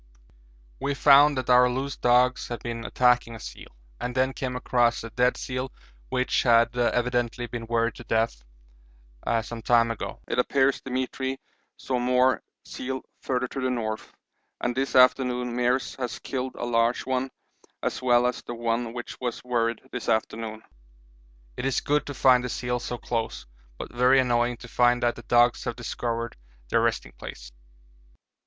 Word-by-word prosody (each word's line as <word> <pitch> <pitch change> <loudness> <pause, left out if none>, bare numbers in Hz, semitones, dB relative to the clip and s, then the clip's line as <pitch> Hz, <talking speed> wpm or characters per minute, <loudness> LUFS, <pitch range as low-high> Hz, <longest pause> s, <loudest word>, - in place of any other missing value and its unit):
We 140 - -1
found 145 0 +6
that 130 - -2
our 125 0 +6
loose 135 +2 -3
dogs 125 +1 +3
had 120 - -6
been 115 -1 -5
attacking 125 -2 +2
a - - -9
seal, - - -9 0.3
and 125 0 -4
then 130 +1 +2
came 130 -2 -4
across 120 -2 +1
a 115 - -7
dead 125 +2 +2
seal 130 0 -4 0.4
which 125 0 +1
had 115 -1 +4
evidently 120 0 0
been 120 -1 -6
worried 115 0 +1
to - - -9
death 110 - 0 1.0
some 115 0 -7
time 115 0 +3
ago. 115 - -5
It 125 - -1
appears 135 +2 +2
Demetri 130 +1 -3 0.4
saw 130 -2 -2
more 125 +1 +3 0.2
seal 130 +1 -5 0.2
further 125 -1 -1
to 135 - -5
the 130 - 0
north, 110 -3 -3 0.5
and 120 0 -1
this 135 +1 -1
afternoon 125 -1 +4
Meares 125 +2 0
has 125 -3 -3
killed 130 -1 -4
a - - -4
large 115 0 +1
one 130 0 -1 0.5
as - - -2
well 120 -1 +4
as 125 0 -1
the 120 - -7
one 115 0 -1
which 120 -1 -7
was 120 -2 -3
worried 115 -2 0
this 125 - -5
morning. 110 0 -1 0.9
It - - -3
is 135 -2 +1
good 150 +1 0
to 145 - -5
find 125 -1 +5
the 125 - -3
seals 125 0 -2
so 120 - -3
close, 115 -1 -3 0.3
but - - -8
very 125 +2 +5
annoying 120 -1 +1
to 125 - -9
find 120 +1 +2
that 120 0 +2
the - - -9
dogs 120 +1 +3
have - - -2
discovered 115 -1 -4 0.3
their - - +3
resting - - 0
place. - - -10
125 Hz, 165 wpm, -26 LUFS, 120-130 Hz, 1.0 s, found